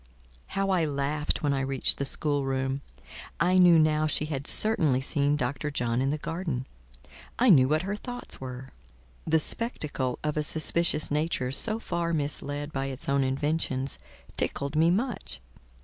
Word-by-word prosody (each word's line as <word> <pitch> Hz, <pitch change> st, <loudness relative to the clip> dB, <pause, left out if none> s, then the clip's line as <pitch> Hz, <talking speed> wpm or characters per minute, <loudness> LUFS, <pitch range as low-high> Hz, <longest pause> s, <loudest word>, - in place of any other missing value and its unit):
How 195 Hz, 0 st, +1 dB
I 180 Hz, -3 st, +2 dB
laughed 145 Hz, +1 st, -1 dB
when 145 Hz, -1 st, +2 dB
I 135 Hz, -, 0 dB
reached 135 Hz, -1 st, +1 dB
the 140 Hz, -, 0 dB
schoolroom. 135 Hz, -2 st, 0 dB, 0.6 s
I 180 Hz, +4 st, +4 dB
knew 175 Hz, -2 st, +7 dB
now 155 Hz, 0 st, +3 dB
she 150 Hz, 0 st, -1 dB
had 140 Hz, -2 st, -4 dB
certainly 160 Hz, -12 st, +3 dB
seen 140 Hz, +2 st, +1 dB
Dr. 145 Hz, +2 st, -2 dB
John 120 Hz, -3 st, -1 dB
in 135 Hz, -, +1 dB
the 150 Hz, -, 0 dB
garden; 160 Hz, -5 st, -3 dB, 0.7 s
I 245 Hz, -2 st, +5 dB
knew 130 Hz, -7 st, +6 dB
what 155 Hz, +4 st, +1 dB
her 200 Hz, +2 st, -2 dB
thoughts 245 Hz, -, -7 dB
were. 130 Hz, 0 st, -7 dB, 0.6 s
The 160 Hz, 0 st, +4 dB
spectacle 150 Hz, -, 0 dB
of 150 Hz, 0 st, -1 dB
a -, -, +2 dB
suspicious 155 Hz, 0 st, +1 dB
nature 150 Hz, -4 st, -1 dB
so 215 Hz, -, 0 dB
far 170 Hz, -6 st, -2 dB
misled 145 Hz, 0 st, -2 dB
by 135 Hz, 0 st, -2 dB
its 135 Hz, 0 st, -6 dB
own 140 Hz, 0 st, +2 dB
inventions, 135 Hz, 0 st, -1 dB, 0.4 s
tickled 140 Hz, +2 st, -2 dB
me 160 Hz, +2 st, +4 dB
much. 215 Hz, +4 st, -1 dB
150 Hz, 160 wpm, -27 LUFS, 135-165 Hz, 0.7 s, knew